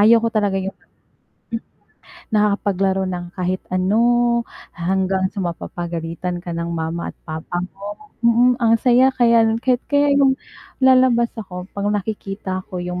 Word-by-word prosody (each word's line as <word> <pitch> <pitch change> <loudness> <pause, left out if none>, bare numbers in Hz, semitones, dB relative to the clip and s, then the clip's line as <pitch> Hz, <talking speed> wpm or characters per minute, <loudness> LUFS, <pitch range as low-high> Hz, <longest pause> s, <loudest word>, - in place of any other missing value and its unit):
ayaw 225 +3 +7
ko - - +3
talaga 205 -3 +1
yung 195 +1 -4 0.8
hmm, 230 - -2 0.7
nakakapaglaro 200 -2 +1
ng 175 -1 -4
kahit 185 0 -1
ano, 185 +4 +2 0.8
hanggang 190 +2 0
sa 200 - -4
mapapagalitan 170 0 -4
ka 175 - -4
ng 170 0 -3
mama 165 +1 -3
at - - -42
papa 160 +2 -4
mo. 205 +8 -9
Mm, 240 +1 +4
ang 230 -1 +4
saya 250 +1 +5
kaya 230 -2 +4
kahit 250 -1 +2
kaya 285 0 +3
yung 275 -1 +4 0.4
lalabas 255 -2 +4
ako 180 -3 -7
'pag 200 0 -2
nakikita 195 -2 -3
ko 185 - -6
yung 180 0 -4
195 Hz, 145 wpm, -20 LUFS, 180-235 Hz, 0.8 s, ayaw